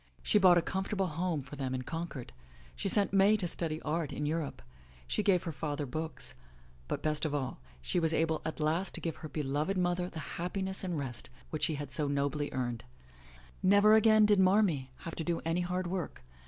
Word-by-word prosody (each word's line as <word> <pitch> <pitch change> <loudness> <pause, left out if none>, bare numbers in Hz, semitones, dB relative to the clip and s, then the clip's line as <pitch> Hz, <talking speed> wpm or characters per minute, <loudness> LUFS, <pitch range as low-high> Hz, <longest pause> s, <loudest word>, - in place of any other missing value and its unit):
She 210 - +4
bought 185 -3 +7
a 170 - +3
comfortable 190 +2 -1
home 165 -2 -1
for 140 +2 -9
them 130 -2 -2
in 130 - -3
Concord, 160 - -5 0.4
she 65 - -2
sent 200 -1 +3
May 200 +2 +5
to 185 -4 -1
study 160 -2 -3
art 160 -1 -1
in 150 - -3
Europe, 155 -1 -2 0.4
she 65 - 0
gave 195 -4 +3
her 165 - -3
father 150 -1 -3
books, 155 - -4 0.5
but - - -3
best 150 -1 0
of 150 -2 0
all, 130 - -3 0.2
she 175 - +1
was 165 -2 +2
able 160 -1 +1
at 160 - -4
last 160 +5 0
to - - -3
give 165 -2 -3
her 155 - -8
beloved 150 +6 -1
mother 175 0 0
the 160 -1 -7
happiness 190 +2 -2
and 180 -3 -2
rest 130 -5 -5 0.2
which 155 - -3
she 155 - -1
had 145 -2 -6
so 145 +2 +1
nobly 140 +1 -1
earned. 120 -3 -2 0.8
Never 205 +2 +6
again 220 0 +6
did 210 -2 +4
*'Marmee" 185 -8 +3 0.2
have 165 - -4
to 165 - -3
do 170 0 0
any 165 +2 +1
hard 180 +1 -1
work. 175 - -4
165 Hz, 205 wpm, -32 LUFS, 145-185 Hz, 0.8 s, bought